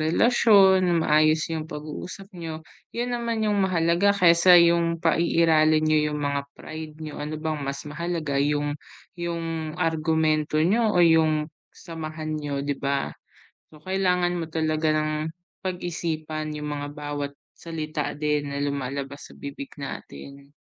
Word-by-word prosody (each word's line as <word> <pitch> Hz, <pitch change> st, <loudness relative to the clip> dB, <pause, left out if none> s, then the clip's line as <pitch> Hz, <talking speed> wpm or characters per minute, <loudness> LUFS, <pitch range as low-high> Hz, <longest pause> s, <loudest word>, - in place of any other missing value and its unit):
relasyon, 190 Hz, -1 st, +4 dB
maayos 155 Hz, +1 st, +4 dB
yung 160 Hz, -1 st, -4 dB
pag-uusap 180 Hz, +6 st, -8 dB
niyo 160 Hz, -2 st, -7 dB, 0.2 s
yun 245 Hz, +1 st, -3 dB
naman 235 Hz, -2 st, -1 dB
yung 205 Hz, -1 st, +1 dB
mahalaga 185 Hz, +2 st, +2 dB
kaysa 175 Hz, -1 st, +7 dB
yung 170 Hz, 0 st, +4 dB
paiiralin 160 Hz, -2 st, +3 dB
niyo 155 Hz, 0 st, +3 dB
yung 150 Hz, -, -3 dB
mga 140 Hz, 0 st, -2 dB
pride 155 Hz, -1 st, -8 dB
niyo. 150 Hz, -, -7 dB
Ano 150 Hz, +1 st, -4 dB
bang 155 Hz, -1 st, -3 dB
mas 140 Hz, 0 st, -4 dB
mahalaga 155 Hz, -2 st, -2 dB
yung 145 Hz, 0 st, +1 dB, 0.4 s
yung 165 Hz, -2 st, -4 dB
argumento 160 Hz, -2 st, +1 dB
niyo 220 Hz, +6 st, +3 dB
o 175 Hz, -, +6 dB
yung 155 Hz, -1 st, +3 dB, 0.2 s
samahan 155 Hz, -1 st, -6 dB
niyo, 140 Hz, -1 st, -3 dB
'di 145 Hz, -1 st, -3 dB
ba? 140 Hz, 0 st, -1 dB, 0.6 s
So, 155 Hz, -, -15 dB
kailangan 180 Hz, +1 st, +1 dB
mo 165 Hz, -2 st, -4 dB
talaga 155 Hz, 0 st, 0 dB
ng 155 Hz, 0 st, +1 dB, 0.5 s
pag-isipan 160 Hz, -4 st, -3 dB
yung 150 Hz, 0 st, -4 dB
mga 145 Hz, 0 st, -4 dB
bawat 145 Hz, -1 st, -5 dB, 0.2 s
salita 155 Hz, -3 st, -4 dB
din 150 Hz, -1 st, 0 dB
na 140 Hz, -, -3 dB
lumalabas 140 Hz, 0 st, -4 dB
sa -, -, -13 dB
bibig 140 Hz, -1 st, -7 dB
natin. 140 Hz, 0 st, -9 dB
155 Hz, 135 wpm, -25 LUFS, 150-170 Hz, 0.6 s, kaysa